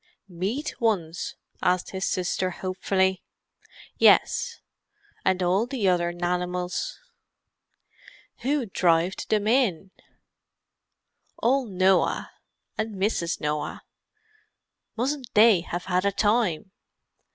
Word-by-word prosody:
"Meat 200 - -4
ones?" 180 -7 -1 0.3
asked 180 -1 +1
his 190 0 -2
sister 185 0 -1
hopefully. 190 +1 0 0.8
"Yes. - - +4 0.6
And 185 -1 +1
all 190 +6 +2
the 245 -6 -1
other 175 -1 +2
nanimals." 180 - -2 1.4
"Who 275 +1 0
drived 175 -2 +1
'em 210 -1 +2
in?" 215 -7 +1 1.5
"Ole 260 +1 +2
Noah 190 -1 +2 0.5
and 220 -1 -2
Mrs. 190 -4 -1
Noah. 150 -1 -3 1.1
Mustn't 260 +1 -2
they 210 -4 +6
have 175 0 -5
had 180 0 +1
a 200 - +2
time! 205 -4 +1
190 Hz, 95 wpm, -25 LUFS, 180-220 Hz, 1.5 s, they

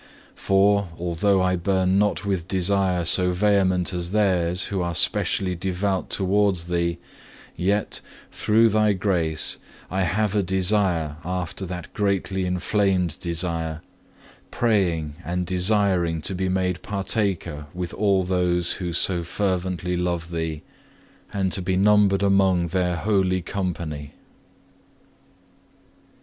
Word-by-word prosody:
For, 100 +1 +2
although 90 +3 +1
I 90 0 +2
burn 95 +1 +1
not 105 0 0
with 95 -4 -2
desire 95 -1 +1
so 90 +2 +3
vehement 95 -3 +2
as 90 -1 -2
theirs 90 -3 +1
who 95 -2 -2
are 85 -1 -2
specially 95 +3 +1
devout 95 +2 -2
towards 95 -2 +1
Thee, 85 -1 0 0.6
yet, 100 +4 0 0.3
through 115 +2 +3
Thy 105 -1 +3
grace, 85 -5 0 0.3
I 95 +1 0
have 105 +3 0
a 105 - +3
desire 95 -4 0
after 90 +1 -4
that 90 0 -7
greatly 95 -2 -1
inflamed 90 -1 0
desire, 85 -2 -3 0.7
praying 85 -10 0
and 90 +1 -2
desiring 90 -3 +1
to 95 - -2
be 95 0 -1
made 90 -1 -1
partaker 95 -6 -2
with 90 -1 -5
all 100 -2 +2
those 90 -1 +1
who 90 -2 -3
so 90 +1 +2
fervently 90 0 -2
love 85 -1 -2
Thee, 80 -2 -3 0.7
and 95 -2 -1
to 95 - +1
be 90 +1 0
numbered 100 0 +4
among 95 -3 +3
their 90 0 0
holy 95 -1 +1
company. 85 -7 -4
90 Hz, 120 wpm, -23 LUFS, 85-100 Hz, 0.7 s, numbered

